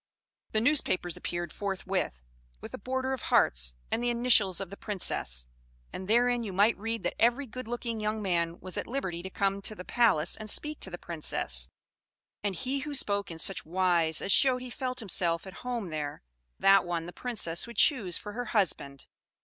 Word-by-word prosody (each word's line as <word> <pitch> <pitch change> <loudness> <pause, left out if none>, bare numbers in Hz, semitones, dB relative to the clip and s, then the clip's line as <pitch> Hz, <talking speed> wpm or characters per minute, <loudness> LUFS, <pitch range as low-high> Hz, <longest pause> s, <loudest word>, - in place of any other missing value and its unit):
"The 215 - +2
newspapers 225 - +2
appeared 175 -2 -4
forthwith 190 - -2 0.4
with - - -9
a - - -6
border 260 +3 -2
of 265 - -4
hearts - - +3 0.2
and 230 - 0
the 240 - +1
initials 235 -6 +4
of 195 -2 -5
the - - -6
Princess; 65 - -1 0.5
and 185 - -6
therein 240 +2 +3
you 210 - -4
might 205 +5 +4
read 225 -1 -3
that - - 0
every 240 +5 +3
good 255 0 -8
looking 235 -1 -3
young 215 +1 -1
man 170 -4 0
was 185 -1 -6
at - - -3
liberty 190 -10 -3
to 190 - -6
come 195 0 0
to 215 - -2
the 180 - -9
palace 215 -10 +3
and 215 -1 -5
speak 300 +7 0
to - - -5
the 175 - -6
Princess; 65 - -3 0.7
and 200 -2 -1
he 260 +9 -1
who 290 +1 -4
spoke 200 -6 0
in 165 - -7
such 190 +3 +1
wise 170 -2 +1
as 200 - 0
showed 255 +2 +4
he 250 - -8
felt 255 0 -3
himself 170 -5 +1
at 190 0 -10
home 240 -6 -3
there, 150 - -4 0.3
that 195 -1 +6
one 170 -2 -3
the 175 - -8
Princess 210 -7 -1
would 235 - -10
choose 210 - +4
for 210 - -7
her 245 +2 -3
husband. 155 - -1
200 Hz, 195 wpm, -29 LUFS, 175-240 Hz, 0.7 s, that